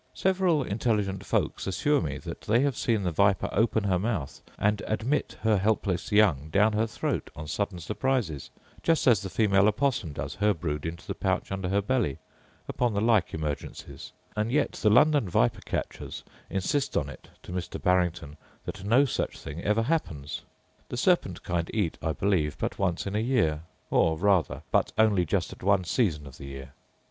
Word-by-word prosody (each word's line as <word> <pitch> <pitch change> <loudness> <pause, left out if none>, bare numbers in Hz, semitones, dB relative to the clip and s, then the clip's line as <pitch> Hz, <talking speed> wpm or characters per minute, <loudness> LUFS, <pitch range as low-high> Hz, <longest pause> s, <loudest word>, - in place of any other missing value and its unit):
Several 185 -6 +2
intelligent 105 -3 -1
folks - - -1
assure 145 +9 +2
me - - -3
that - - -8
they 115 +4 +2
have 140 -3 +1
seen 110 -3 0
the 90 - 0
viper 100 +4 +2
open 110 +1 +2
her 95 -3 +1
mouth 95 - -3 0.2
and 105 0 +1
admit 120 +7 -1
her 110 -2 +4
helpless 100 -3 0
young 85 -9 +3
down 105 +6 +3
her 110 +1 +1
throat - - -3
on 80 - -7
sudden 100 +3 -2
surprises, 105 - -2 0.3
just 165 -1 +2
as 115 -6 +5
the 95 - -5
female 100 +2 +3
opossum 110 - 0
does 70 -1 -5
her 105 +2 +2
brood 75 -2 -3
into 85 +1 -7
the - - -3
pouch - - -1
under 95 -2 -2
her 100 +1 +1
belly, 105 - 0 0.5
upon 120 -4 0
the - - +2
like 110 -3 +3
emergencies 75 -2 -5 0.2
and 110 +2 -1
yet 150 - +2
the 105 - +1
London 140 -1 +4
viper - - +2
catchers - - -4 0.3
insist 115 +9 0
on - - 0
it, - - -11
to - - -9
Mr. 90 -1 -4
Barrington, 90 -4 0 0.3
that - - -6
no 120 +8 +4
such 130 - -2
thing 75 +4 -7
ever 105 +2 +2
happens. 85 - -2 0.5
The - - -4
serpent - - +1
kind 85 -1 -2
eat, 100 -7 0
I 80 - -1
believe, 85 -7 0
but - - -3
once 90 -3 0
in 100 +1 -3
a - - +2
year; 110 - +1 0.3
or 80 -1 +3
rather, 85 -7 +2
but - - +2
only 105 -5 +4
just 90 +3 -1
at - - -15
one 100 0 +3
season 85 - 0
of 70 -2 -12
the 70 - -8
year. 70 -1 -8
100 Hz, 185 wpm, -27 LUFS, 85-110 Hz, 0.5 s, as